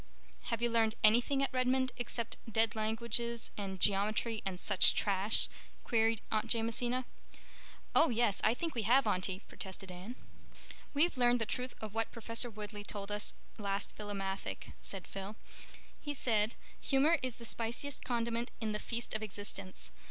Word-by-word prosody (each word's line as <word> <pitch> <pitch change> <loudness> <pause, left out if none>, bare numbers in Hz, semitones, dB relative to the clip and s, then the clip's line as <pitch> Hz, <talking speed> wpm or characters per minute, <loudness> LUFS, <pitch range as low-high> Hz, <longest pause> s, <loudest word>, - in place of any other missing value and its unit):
"Have 230 0 -2
you 240 - +3
learned 225 -1 +3
anything 240 +6 +5
at 275 - -1
Redmond 255 0 +2
except 235 -1 -2 0.2
dead 225 0 +2
languages 230 +1 -1
and 195 -2 -4
geometry 215 +3 +2
and 185 -2 -3
such 200 -1 +5
trash?" 200 +2 +3 0.4
queried 225 -1 +2
Aunt 215 -1 +1
Jamesina. 240 +2 +1 0.9
"Oh, 330 - +6
yes. 230 -4 +2
I 230 - +4
think 330 +5 -2
we 235 - -1
have, 245 +5 +5
Aunty," 185 -2 0
protested 190 -1 -7
Anne. 185 +7 -7 0.8
"We've 315 +1 +3
learned 245 0 +5
the 225 - +1
truth 250 +3 -3
of 215 -2 -6
what 225 0 -1
Professor 230 +1 0
Woodleigh 210 -1 -7
told 205 0 -5
us 205 0 -1 0.2
last 200 -1 -1
Philomathic," 195 -2 -4
said 195 -2 -5
Phil. 195 +2 -6 0.6
"He 290 -1 -4
said, 220 -4 +1 0.2
'Humor 295 +5 +4
is 255 -3 -2
the 235 - -10
spiciest 235 +5 -3
condiment 235 -1 -1
in 220 -2 -1
the 210 - -2
feast 235 +1 -3
of 215 - +1
existence. 200 -2 -5
225 Hz, 155 wpm, -34 LUFS, 205-240 Hz, 0.9 s, Oh